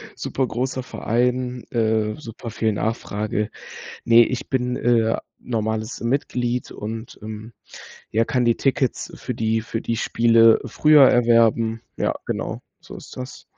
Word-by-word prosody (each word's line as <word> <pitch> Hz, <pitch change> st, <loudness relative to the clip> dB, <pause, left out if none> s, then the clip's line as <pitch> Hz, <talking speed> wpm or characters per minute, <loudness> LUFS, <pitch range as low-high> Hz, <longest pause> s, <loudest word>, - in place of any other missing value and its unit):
super 130 Hz, -1 st, -2 dB
großer 130 Hz, +2 st, -2 dB
Verein, 125 Hz, +1 st, -1 dB
äh, 110 Hz, -2 st, +1 dB
super 115 Hz, -4 st, -9 dB
viel 110 Hz, 0 st, 0 dB
Nachfrage. 105 Hz, -1 st, -2 dB, 0.6 s
Ne, 115 Hz, 0 st, +7 dB
ich 125 Hz, -, -4 dB
bin, 125 Hz, -1 st, -1 dB
äh, 115 Hz, -2 st, +2 dB, 0.2 s
normales 110 Hz, 0 st, -3 dB
Mitglied 125 Hz, -1 st, -1 dB
und, 110 Hz, +2 st, -7 dB
ähm, 110 Hz, +1 st, -7 dB, 0.6 s
ja 115 Hz, +2 st, +2 dB
kann 125 Hz, +1 st, 0 dB
die 120 Hz, -1 st, +3 dB
Tickets 135 Hz, -2 st, 0 dB
für -, -, -5 dB
die 110 Hz, 0 st, 0 dB
für 115 Hz, +1 st, -4 dB
die 115 Hz, -, -2 dB
Spiele 115 Hz, 0 st, +4 dB
früher 150 Hz, -3 st, +6 dB
erwerben. 115 Hz, -1 st, +3 dB, 0.2 s
Ja, -, -, 0 dB
genau, -, -, -3 dB, 0.2 s
so -, -, -11 dB
ist -, -, -12 dB
das. 130 Hz, 0 st, -8 dB
115 Hz, 135 wpm, -22 LUFS, 110-125 Hz, 0.6 s, Ne